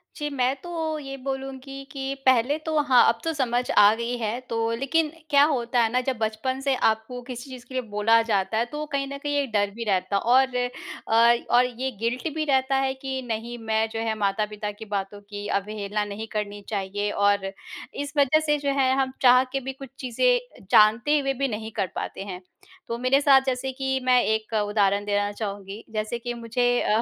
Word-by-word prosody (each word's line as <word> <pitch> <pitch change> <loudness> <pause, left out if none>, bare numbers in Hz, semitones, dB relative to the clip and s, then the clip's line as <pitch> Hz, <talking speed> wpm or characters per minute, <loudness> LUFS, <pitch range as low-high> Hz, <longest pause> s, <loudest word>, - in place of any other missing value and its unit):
जी, 295 -1 -3
मैं 260 -1 0
तो 320 -2 -3
ये 275 -1 -7
बोलूँगी 270 0 -5
कि 270 -1 -3
पहले 260 +3 +4
तो 315 -1 0
हाँ, 260 -4 +6
अब 230 - +2
तो 325 - -1
समझ 250 -3 0
आ 205 0 +7
गई 235 +2 -3
है। 230 +1 -2
तो 225 0 0
लेकिन 300 +5 0 0.2
क्या 285 -1 +6
होता 245 -5 0
है 225 - +1
ना? 250 +1 +2
जब 255 -1 -2
बचपन 220 +4 -2
से 270 -1 +1
आपको 220 +1 0
किसी 250 +2 -8
चीज़ 255 -2 -10
के 260 - -13
लिए 260 - 0
बोला 215 +2 +4
जाता 205 -2 0
है, 230 - +2
तो 295 +5 -7
वो 305 - -3
कहीं 275 -1 -1
ना 280 0 -6
कहीं 290 +1 -3
एक 270 -4 -5
डर 205 -1 +2
भी 230 - -4
रहता 185 0 0
है। 200 - +2
और 255 +2 +3 0.5
अ, 230 +1 +5 0.2
और 250 - +6
ये 250 +2 -3
गिल्ट 235 +7 -1
भी 310 -1 -1
रहता 270 -1 +2
है 270 0 +1
कि 265 0 -5
नहीं, 230 +1 -4
मैं 220 -1 0
जो 225 0 -5
है, 225 -1 -1
माता-पिता 210 +1 -1
की 215 +2 -11
बातों 205 0 -4
की 205 0 -7
अवहेलना 210 +1 -2
नहीं 205 +2 -6
करनी 205 -1 -3
चाहिए। 205 0 -2
और 200 -1 +2 0.5
इस 285 0 -4
वज़ह 285 +2 +4
से 295 -1 +2
जो 285 -1 -2
है, 260 -1 +3
हम 260 -1 -2
चाह 250 0 +7
के 270 - -1
भी 265 0 -5
कुछ 270 0 -10
चीज़ें, - - 0
जानते 235 +8 +5
हुए 275 -1 0
भी 275 +1 -1
नहीं 220 -2 -5
कर 200 -4 -1
पाते - - -4
हैं। 185 -2 -7 0.5
तो 230 - -3
मेरे 255 +3 +3
साथ 275 -2 +6
जैसे 265 0 -1
कि 265 0 -1
मैं 250 -1 +5
एक 220 +1 -1
उदाहरण 205 -1 +1
देना 205 0 0
चाहूँगी। 205 0 -6
जैसे 215 +2 -2
कि 240 +1 -4
मुझे 235 +1 -1 0.2
अ, 215 +2 +2
240 Hz, 215 wpm, -25 LUFS, 215-270 Hz, 0.5 s, आ